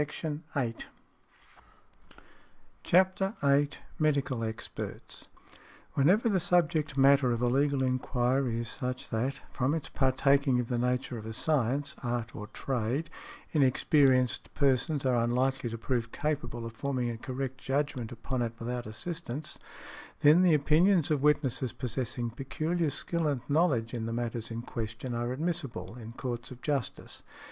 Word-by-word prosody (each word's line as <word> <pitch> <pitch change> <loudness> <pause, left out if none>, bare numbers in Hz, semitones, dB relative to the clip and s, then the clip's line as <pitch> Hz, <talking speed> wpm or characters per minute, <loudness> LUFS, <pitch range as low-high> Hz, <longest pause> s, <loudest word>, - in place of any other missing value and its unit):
|108| 150 -5 -3 2.0
CHAPTER 190 +3 +3
VIII. 140 +1 +4 0.3
MEDICAL 140 -5 +1
EXPERTS. 110 0 -6 0.7
Whenever 185 +12 +4
the 200 -4 +3
subject 160 -4 +1
matter 135 -1 +5
of 120 - 0
a 125 - +1
legal 135 +2 +2
enquiry 125 -1 +1
is 120 - -5
such 125 +1 -4
that, 125 +4 -2
from 130 +4 0
its 160 - -4
partaking 135 0 +3
of 120 - -2
the 120 -2 0
nature 125 -1 -1
of 110 - -8
a 110 - -5
science, 140 +1 0
art 120 -2 -3
or 105 -1 -6
trade, 125 +5 -2 0.4
inexperienced 135 -2 +3
persons 140 +1 +2
are 125 -3 +3
unlikely 125 +1 +1
to 115 - -5
prove 115 -1 -2
capable 120 -6 -2
of 115 - -6
forming 125 -1 -1
a 115 - -6
correct 130 0 -4
judgment 135 -4 -1
upon 120 +2 -3
it 115 -1 -1
without 120 0 -4
assistance, 150 +4 -5 0.6
then 155 +4 +7
the 175 -4 +5
opinions 160 +3 +4
of 145 -3 +2
witnesses 140 -4 +2
possessing 120 -2 -3
peculiar 155 +6 -1
skill 165 +3 -1
and 140 -4 0
knowledge 140 -7 +2
in 115 -2 -3
the 115 - -3
matters 115 -1 -3
in 115 0 -5
question 115 +1 -5
are 120 +1 -1
admissible 155 -4 -3
in 115 -2 -9
courts 120 -2 -4
of 125 - -10
justice. 140 -5 -2
130 Hz, 140 wpm, -30 LUFS, 120-150 Hz, 2.0 s, then